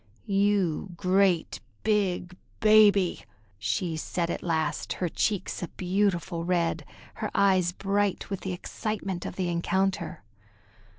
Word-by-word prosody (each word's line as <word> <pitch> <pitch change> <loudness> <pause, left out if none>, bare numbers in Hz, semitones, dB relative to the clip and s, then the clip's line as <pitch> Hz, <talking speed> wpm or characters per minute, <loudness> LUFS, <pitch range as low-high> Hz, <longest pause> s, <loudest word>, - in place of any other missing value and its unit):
"You 195 -3 +1
great 185 - +2 0.2
big 190 -4 0 0.2
baby!" 210 -4 +5 0.4
she 165 - -1
said 170 +2 -2
at - - -4
last, 160 -3 -1
her 180 - -2
cheeks 205 +3 -1
a 175 - -3
beautiful 180 -2 -1
red, 170 -1 0 0.4
her - - -1
eyes 185 -3 +4
bright 200 +1 -1
with 195 - -2
the 190 - -4
excitement 195 0 -4
of - - -7
the 185 -1 -1
encounter. 185 +1 -1
185 Hz, 120 wpm, -27 LUFS, 175-200 Hz, 0.4 s, baby